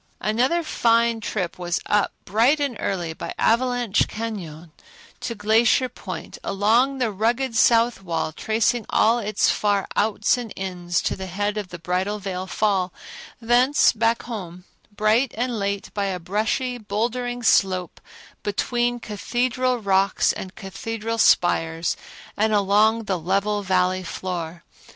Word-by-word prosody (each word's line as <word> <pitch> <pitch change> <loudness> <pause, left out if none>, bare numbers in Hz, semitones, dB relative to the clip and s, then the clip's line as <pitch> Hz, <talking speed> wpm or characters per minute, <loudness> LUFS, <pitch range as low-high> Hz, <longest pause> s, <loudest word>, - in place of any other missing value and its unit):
Another 255 +11 +1
fine 230 -5 +2
trip 185 -5 -3
was 175 -1 -1
up, 210 -1 +2
bright 240 +9 +3
and 280 -4 -1
early, 175 -4 -2
by - - -7
Avalanche 245 -2 +2
Cañon 175 -8 -6 0.5
to 230 - -4
Glacier 225 +4 +3
Point, 185 -8 -8
along 230 +7 +2
the 245 -4 0
rugged 230 +5 0
south 230 0 +4
wall, 165 -3 -2
tracing 220 +6 0
all 230 +2 +3
its 210 -2 +1
far 205 -2 0
outs 215 +3 +2
and 230 -3 -6
ins 175 -2 -2
to - - -1
the 190 0 -6
head 205 +3 -2
of 210 -3 -4
the 180 - -8
Bridal 180 +5 -1
Veil 190 -2 -5
Fall, 190 -3 0 0.5
thence 245 +4 +4
back 230 +1 +1
home, 180 -7 -7 0.3
bright 215 +4 +1
and 240 -1 -1
late, 200 0 -3
by 200 -1 -1
a 190 -2 -2
brushy, 220 +7 -1
bouldery 240 +4 -2
slope 185 -4 +2 0.4
between 240 +4 -1
Cathedral 250 +4 -1
rocks 195 -3 +2
and 190 0 -8
Cathedral 225 +3 -5
spires 165 -4 +2 0.4
and 215 +1 +1
along 210 +3 +3
the 190 -4 -2
level 200 +5 0
Valley 185 -1 +1
floor. 170 -2 -5
210 Hz, 135 wpm, -23 LUFS, 190-235 Hz, 0.5 s, south